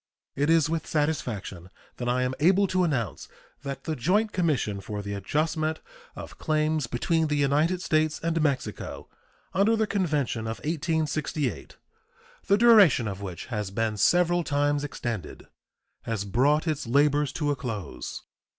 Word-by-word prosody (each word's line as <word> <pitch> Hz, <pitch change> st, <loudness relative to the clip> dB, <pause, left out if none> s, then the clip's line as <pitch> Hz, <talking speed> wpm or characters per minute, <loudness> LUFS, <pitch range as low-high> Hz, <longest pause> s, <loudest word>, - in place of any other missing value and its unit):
It 145 Hz, +2 st, +1 dB
is 165 Hz, -2 st, +4 dB
with 160 Hz, -1 st, -2 dB
satisfaction 115 Hz, -, -2 dB, 0.3 s
that 120 Hz, -1 st, -2 dB
I 125 Hz, +1 st, +1 dB
am 125 Hz, 0 st, -1 dB
able 190 Hz, +6 st, +4 dB
to 185 Hz, -1 st, +1 dB
announce 130 Hz, -, -2 dB, 0.3 s
that 140 Hz, -1 st, -6 dB
the 160 Hz, -, -2 dB
joint 200 Hz, -, +1 dB
commission 140 Hz, -, 0 dB
for 105 Hz, +2 st, -5 dB
the 100 Hz, 0 st, -4 dB
adjustment 155 Hz, -, -1 dB, 0.4 s
of -, -, -10 dB
claims 155 Hz, -3 st, 0 dB
between 160 Hz, +7 st, 0 dB
the 150 Hz, -, 0 dB
United 150 Hz, +6 st, +1 dB
States 155 Hz, -1 st, +1 dB
and 165 Hz, 0 st, -1 dB
Mexico 140 Hz, -4 st, -3 dB, 0.4 s
under 205 Hz, +5 st, +3 dB
the 220 Hz, -1 st, +1 dB
convention 150 Hz, -, -1 dB
of 110 Hz, -, -3 dB
1868, 155 Hz, -, -2 dB, 0.7 s
the 200 Hz, -, +4 dB
duration 205 Hz, -, +6 dB
of 100 Hz, -1 st, -5 dB
which 95 Hz, -4 st, -6 dB
has 105 Hz, -3 st, -2 dB
been 110 Hz, +2 st, -1 dB
several 175 Hz, -, +3 dB
times 145 Hz, -1 st, 0 dB
extended, 115 Hz, -, -5 dB, 0.6 s
has 110 Hz, -3 st, -3 dB
brought 140 Hz, -, +2 dB
its 155 Hz, -5 st, -2 dB
labors 145 Hz, +2 st, +3 dB
to 150 Hz, -2 st, 0 dB
a -, -, 0 dB
close. 115 Hz, -9 st, -6 dB
150 Hz, 150 wpm, -26 LUFS, 120-165 Hz, 0.7 s, duration